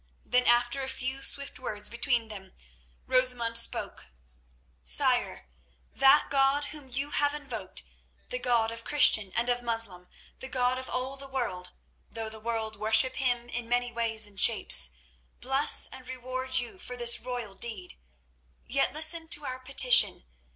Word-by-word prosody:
Then, 250 Hz, 0 st, +1 dB
after 240 Hz, +3 st, +2 dB
a 265 Hz, -, -5 dB
few 260 Hz, +1 st, -4 dB
swift 280 Hz, +1 st, +1 dB
words 210 Hz, -5 st, -4 dB
between 235 Hz, -1 st, 0 dB
them, 190 Hz, -3 st, -9 dB, 0.5 s
Rosamund 250 Hz, -3 st, +1 dB
spoke. -, -, -2 dB, 0.7 s
"Sire, -, -, +1 dB, 0.5 s
that 275 Hz, +2 st, +4 dB
God 275 Hz, +1 st, +2 dB
whom 290 Hz, -4 st, -11 dB
you 275 Hz, +3 st, -3 dB
have 290 Hz, 0 st, 0 dB
invoked, 290 Hz, -1 st, -6 dB, 0.5 s
the -, -, -4 dB
God 230 Hz, -, 0 dB
of 230 Hz, 0 st, -9 dB
Christian 220 Hz, -9 st, +4 dB
and 235 Hz, +1 st, 0 dB
of 245 Hz, 0 st, 0 dB
Moslem, 225 Hz, -7 st, -2 dB, 0.3 s
the 260 Hz, -, -7 dB
God 255 Hz, -1 st, -1 dB
of 260 Hz, -, -9 dB
all 260 Hz, +2 st, -4 dB
the 275 Hz, 0 st, -10 dB
world, 235 Hz, -9 st, -4 dB, 0.4 s
though 225 Hz, -1 st, -6 dB
the 220 Hz, 0 st, -9 dB
world 220 Hz, -1 st, -4 dB
worship 220 Hz, +5 st, +3 dB
Him 245 Hz, -2 st, -1 dB
in 240 Hz, -1 st, -6 dB
many 245 Hz, 0 st, -1 dB
ways 225 Hz, -2 st, -2 dB
and 200 Hz, -2 st, -8 dB
shapes, 60 Hz, 0 st, +4 dB, 0.5 s
bless 270 Hz, +3 st, +4 dB
and 255 Hz, -1 st, -12 dB
reward 255 Hz, 0 st, -4 dB
you 250 Hz, +9 st, -3 dB
for 250 Hz, -7 st, -8 dB
this 240 Hz, -1 st, +5 dB
royal 245 Hz, -5 st, -6 dB
deed. 195 Hz, -3 st, -3 dB, 0.7 s
Yet 275 Hz, +2 st, 0 dB
listen 320 Hz, +2 st, -2 dB
to 295 Hz, -2 st, +1 dB
our 255 Hz, 0 st, -6 dB
petition. 255 Hz, -, +3 dB
245 Hz, 155 wpm, -28 LUFS, 225-265 Hz, 0.7 s, this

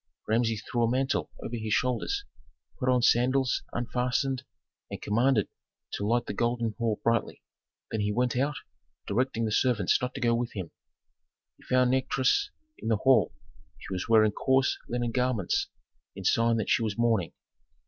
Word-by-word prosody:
Rameses 110 Hz, -1 st, +1 dB
threw 120 Hz, -, -2 dB
a 115 Hz, -, +3 dB
mantle 135 Hz, +3 st, 0 dB
over 120 Hz, -, -4 dB
his 110 Hz, -1 st, -2 dB
shoulders, 125 Hz, -, -1 dB, 0.5 s
put 130 Hz, -2 st, 0 dB
on 125 Hz, -1 st, +3 dB
sandals 130 Hz, +2 st, +3 dB
unfastened 125 Hz, +2 st, -1 dB, 0.5 s
and -, -, -6 dB
commanded 115 Hz, +1 st, +2 dB, 0.5 s
to 100 Hz, -, -2 dB
light 120 Hz, +1 st, +1 dB
the -, -, -4 dB
golden 120 Hz, 0 st, 0 dB
hall 115 Hz, -3 st, 0 dB
brightly. 115 Hz, 0 st, 0 dB, 0.5 s
Then 110 Hz, -, -2 dB
he 105 Hz, 0 st, 0 dB
went 125 Hz, +3 st, 0 dB
out, 140 Hz, +3 st, 0 dB, 0.5 s
directing 115 Hz, +1 st, 0 dB
the 110 Hz, -, -2 dB
servants 110 Hz, -4 st, +2 dB
not 125 Hz, 0 st, -3 dB
to -, -, -4 dB
go 120 Hz, -2 st, +2 dB
with 120 Hz, 0 st, -2 dB
him. 95 Hz, -5 st, -6 dB, 0.9 s
He -, -, -21 dB
found 125 Hz, -1 st, +3 dB
Nikotris 130 Hz, -, +1 dB, 0.3 s
in -, -, -6 dB
the 110 Hz, -2 st, +2 dB
hall; 130 Hz, +4 st, +3 dB, 0.4 s
she 95 Hz, -, -8 dB
was 95 Hz, +4 st, -4 dB
wearing 110 Hz, -2 st, +5 dB
coarse 130 Hz, +4 st, +2 dB
linen 120 Hz, -1 st, -1 dB
garments 125 Hz, -6 st, 0 dB, 0.5 s
in 95 Hz, -, -7 dB
sign 115 Hz, +4 st, +3 dB
that 110 Hz, -, -1 dB
she -, -, +3 dB
was 110 Hz, -2 st, -2 dB
mourning. 115 Hz, -7 st, +1 dB
120 Hz, 165 wpm, -28 LUFS, 110-125 Hz, 0.9 s, wearing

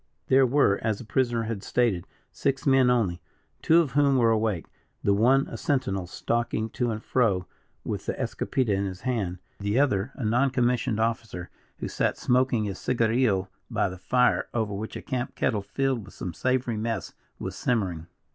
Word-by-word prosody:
There 130 Hz, 0 st, +6 dB
were, 120 Hz, -6 st, +3 dB
as 110 Hz, -2 st, 0 dB
the -, -, -9 dB
prisoner 120 Hz, 0 st, +1 dB
had 110 Hz, -3 st, -4 dB
stated, 110 Hz, -7 st, 0 dB, 0.2 s
six 135 Hz, +2 st, -1 dB
men 135 Hz, -2 st, +5 dB
only; 105 Hz, -8 st, +1 dB, 0.4 s
two 165 Hz, +2 st, +5 dB
of 150 Hz, -6 st, -2 dB
whom 140 Hz, -1 st, +3 dB
were 115 Hz, -2 st, +4 dB
awake, 110 Hz, -6 st, 0 dB, 0.4 s
the 100 Hz, -, +3 dB
one 130 Hz, +7 st, +4 dB
a -, -, -6 dB
sentinel 130 Hz, -, -1 dB
stalking 115 Hz, +2 st, -1 dB
to 120 Hz, 0 st, -1 dB
and 110 Hz, -1 st, -4 dB
fro 100 Hz, -8 st, +1 dB, 0.4 s
with -, -, -4 dB
the -, -, 0 dB
escopeta 125 Hz, -6 st, -1 dB
in 100 Hz, +1 st, 0 dB
his 95 Hz, -1 st, -6 dB
hand, 105 Hz, -8 st, -1 dB, 0.2 s
the 100 Hz, +3 st, 0 dB
other, 120 Hz, -4 st, +1 dB
a 125 Hz, -, -4 dB
non 120 Hz, +6 st, +3 dB
commissioned 125 Hz, -4 st, +1 dB
officer, 110 Hz, -6 st, -2 dB, 0.3 s
who -, -, -4 dB
sat -, -, 0 dB
smoking 125 Hz, -2 st, +2 dB
his 100 Hz, -2 st, -4 dB
cigarillo 115 Hz, -5 st, +1 dB, 0.2 s
by -, -, +1 dB
the 90 Hz, 0 st, -9 dB
fire, 125 Hz, +7 st, +2 dB
over 110 Hz, -3 st, 0 dB
which 105 Hz, +3 st, -5 dB
a -, -, -6 dB
camp 130 Hz, -2 st, -3 dB
kettle, 105 Hz, -, 0 dB
filled 115 Hz, +3 st, -1 dB
with 95 Hz, -, -14 dB
some 90 Hz, -, -5 dB
savory 125 Hz, +1 st, 0 dB
mess, 115 Hz, +1 st, -3 dB, 0.2 s
was -, -, -5 dB
simmering. 95 Hz, -9 st, -1 dB
115 Hz, 180 wpm, -26 LUFS, 100-130 Hz, 0.4 s, There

